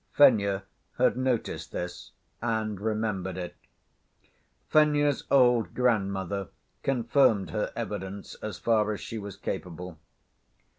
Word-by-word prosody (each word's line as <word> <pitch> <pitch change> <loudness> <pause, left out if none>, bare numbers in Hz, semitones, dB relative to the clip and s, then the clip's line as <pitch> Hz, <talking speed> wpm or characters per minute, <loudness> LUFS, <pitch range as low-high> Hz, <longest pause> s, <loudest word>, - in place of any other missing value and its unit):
(Fenya 100 -8 +5 0.3
had - - +3
noticed 130 -2 -1
this 90 0 -6 0.3
and 110 -3 -1
remembered 105 -4 -1
it.) 90 -1 -5 1.1
Fenya's 145 -2 +3
old 125 -4 +4
grandmother 100 -5 0 0.3
confirmed 120 -4 +2
her 105 - -1
evidence 100 -3 -5
as 105 -4 -5
far 110 -2 +2
as 105 - -5
she 115 - -5
was 100 -1 -7
capable. 90 -3 -5
105 Hz, 105 wpm, -28 LUFS, 95-120 Hz, 1.1 s, Fenya